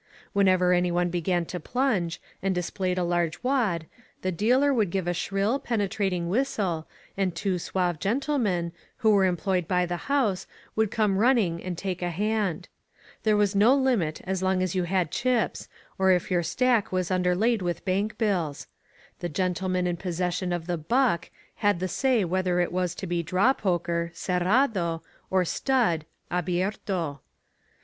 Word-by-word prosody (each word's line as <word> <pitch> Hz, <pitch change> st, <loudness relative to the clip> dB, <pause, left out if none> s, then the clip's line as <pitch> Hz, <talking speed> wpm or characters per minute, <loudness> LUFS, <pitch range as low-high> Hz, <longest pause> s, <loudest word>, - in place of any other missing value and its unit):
Whenever 185 Hz, -3 st, +4 dB
anyone 175 Hz, 0 st, +1 dB
began 175 Hz, 0 st, 0 dB
to 180 Hz, -, -5 dB
plunge, 205 Hz, -, 0 dB, 0.2 s
and 190 Hz, 0 st, 0 dB
displayed 180 Hz, +1 st, -2 dB
a 180 Hz, -, +1 dB
large 175 Hz, 0 st, -1 dB
wad, 230 Hz, -11 st, +1 dB, 0.4 s
the 185 Hz, -, 0 dB
dealer 250 Hz, -, +3 dB
would 215 Hz, -7 st, +2 dB
give 185 Hz, 0 st, -2 dB
a 175 Hz, -, +1 dB
shrill, 200 Hz, +8 st, 0 dB
penetrating 195 Hz, -6 st, -1 dB
whistle 195 Hz, -7 st, -1 dB, 0.3 s
and 190 Hz, -3 st, -1 dB
two 185 Hz, +1 st, -1 dB
suave 175 Hz, -2 st, -1 dB
gen 215 Hz, -, +1 dB
tlemen, 210 Hz, -, 0 dB, 0.3 s
who 220 Hz, -, +3 dB
were 200 Hz, -2 st, +5 dB
employed 180 Hz, -1 st, 0 dB
by 180 Hz, -1 st, +2 dB
the 175 Hz, +7 st, -5 dB
house, 230 Hz, -10 st, +1 dB, 0.3 s
would 220 Hz, -1 st, +2 dB
come 205 Hz, -3 st, +1 dB
running 215 Hz, -8 st, +2 dB
and 180 Hz, -2 st, -4 dB
take 185 Hz, -1 st, -3 dB
a 175 Hz, -, 0 dB
hand. 205 Hz, -1 st, -1 dB, 0.5 s
There 215 Hz, -1 st, +3 dB
was 205 Hz, -1 st, +2 dB
no 220 Hz, +7 st, +6 dB
limit 235 Hz, -, +1 dB
as 190 Hz, 0 st, -2 dB
long 185 Hz, 0 st, +1 dB
as 185 Hz, -, -1 dB
you 185 Hz, -2 st, 0 dB
had 180 Hz, -3 st, 0 dB
chips, 245 Hz, -4 st, 0 dB, 0.3 s
or 190 Hz, 0 st, +4 dB
if 180 Hz, 0 st, +2 dB
your 175 Hz, -1 st, +3 dB
stack 225 Hz, +6 st, +1 dB
was 185 Hz, -1 st, -1 dB
underlaid 185 Hz, +5 st, +2 dB
with 175 Hz, -1 st, -3 dB
bank 205 Hz, +3 st, 0 dB
bills. 180 Hz, -10 st, -1 dB, 0.5 s
The 175 Hz, -, -3 dB
gentleman 185 Hz, +1 st, -1 dB
in 175 Hz, -1 st, -1 dB
possession 180 Hz, +1 st, -2 dB
of 175 Hz, -2 st, -2 dB
the 175 Hz, -1 st, -2 dB
"buck" 225 Hz, -, +1 dB, 0.3 s
had 205 Hz, -4 st, +2 dB
the 185 Hz, -, -1 dB
say 245 Hz, +1 st, +1 dB
whether 180 Hz, 0 st, 0 dB
it 175 Hz, -, +1 dB
was 180 Hz, -1 st, -1 dB
to -, -, -5 dB
be 175 Hz, -1 st, -1 dB
draw 185 Hz, -, +3 dB
poker 170 Hz, -5 st, -1 dB
{cerrado) 180 Hz, -1 st, +1 dB, 0.3 s
or 185 Hz, -1 st, +2 dB
stud 195 Hz, -, +1 dB, 0.3 s
(abierto). 180 Hz, -3 st, -1 dB
185 Hz, 165 wpm, -26 LUFS, 175-210 Hz, 0.5 s, no